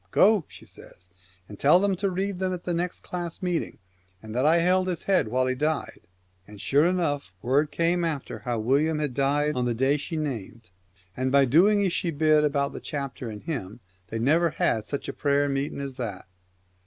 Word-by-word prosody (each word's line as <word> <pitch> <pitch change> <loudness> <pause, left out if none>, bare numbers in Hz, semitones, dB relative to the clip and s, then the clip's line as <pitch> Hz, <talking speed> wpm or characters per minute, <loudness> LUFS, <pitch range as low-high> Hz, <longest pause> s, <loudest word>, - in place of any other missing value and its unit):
" - - -37
Go," 205 -5 +4
she - - -14
says, 90 0 -13 0.2
" 95 -1 -30
and 105 - -11
tell 150 +6 +6
them 200 0 +1
to 195 +2 0
read 190 +1 -2
them 185 -1 0
at 180 - -6
the 175 - -2
next 175 +1 -3
class 175 -1 -6
meeting, 175 -2 -2 0.5
and 110 0 -8
that 130 +5 +2
I 165 +2 +5
held 185 +2 +2
his 180 -2 -3
head 190 - +2
while 130 +3 +1
he 130 - 0
died." 150 +3 -2 0.5
And 105 -1 -12
sure 145 +9 +3
enough 160 - -1
word 140 +5 +2
came 170 +2 +1
after 155 -5 -3
that - - -17
how 120 -2 -1
William 140 +8 +1
had 150 -4 -2
died 145 +3 +1
on 125 -2 -1
the 120 -1 0
day 135 +4 +2
she 160 +3 -5
named. 115 -8 -5 0.4
And, 130 0 -1 0.2
doing 200 +6 +5
as 180 - 0
she 170 - 0
bid 155 -1 +3
about 140 -1 0
the - - -7
chapter 140 -5 -5
and 105 -1 -8
hymn, 125 - -5 0.3
they 115 - -4
never 155 +9 +3
had 110 -7 0
such 140 - -4
a - - -4
prayer 145 0 +1
meeting 140 +1 -2
as 140 -1 -5
that. 110 -7 -5
145 Hz, 215 wpm, -26 LUFS, 130-170 Hz, 0.5 s, tell